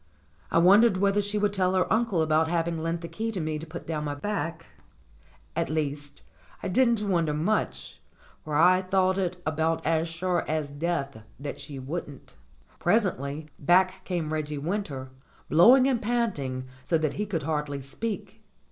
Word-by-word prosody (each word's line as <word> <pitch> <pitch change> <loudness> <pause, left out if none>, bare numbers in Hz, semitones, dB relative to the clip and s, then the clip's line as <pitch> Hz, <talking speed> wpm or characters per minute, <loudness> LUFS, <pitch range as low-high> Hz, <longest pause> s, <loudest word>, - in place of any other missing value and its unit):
I - - +1
won 185 +5 +7
dered 230 -5 +4
whether 200 +1 +2
she 205 +1 -2
would 205 -1 +1
tell 185 -1 +1
her 185 - +3
uncle 220 -7 +2
about 155 +1 +2
having 170 0 0
lent 165 +1 -2
the 170 - -5
key 225 +5 -3
to 190 - -2
me 155 -1 -2
to 160 - -8
put 170 +2 -8
down 155 -2 -3
my 145 -1 -3
back; 165 -1 -3 0.9
at - - -1
least, 145 -2 -3 0.4
I - - -2
didn't 230 0 +2
wonder 165 -5 +1
much, 180 +8 -2 0.4
for 155 -1 -4
I 180 +4 +5
thought 190 0 +1
it 180 -1 -2
about 160 +1 0
as 165 +1 +1
sure 175 +1 -1
as 155 -2 -2
death 145 -5 -2 0.2
that 145 - -6
she 140 - -8
wouldn't. 140 +1 -7 0.4
Presently 155 - 0
back 185 +4 +3
came 165 -4 -2
Reggie 150 -1 -2
Winter, 145 -5 -3 0.4
blbwing 245 - +7
and 255 -4 +1
panting 195 - -1 0.2
so 165 +6 +2
that 155 -2 -1
he 210 +1 -3
could 165 -7 -2
hardly 150 -2 -2
speak. 200 +11 -5
165 Hz, 170 wpm, -27 LUFS, 150-190 Hz, 0.9 s, won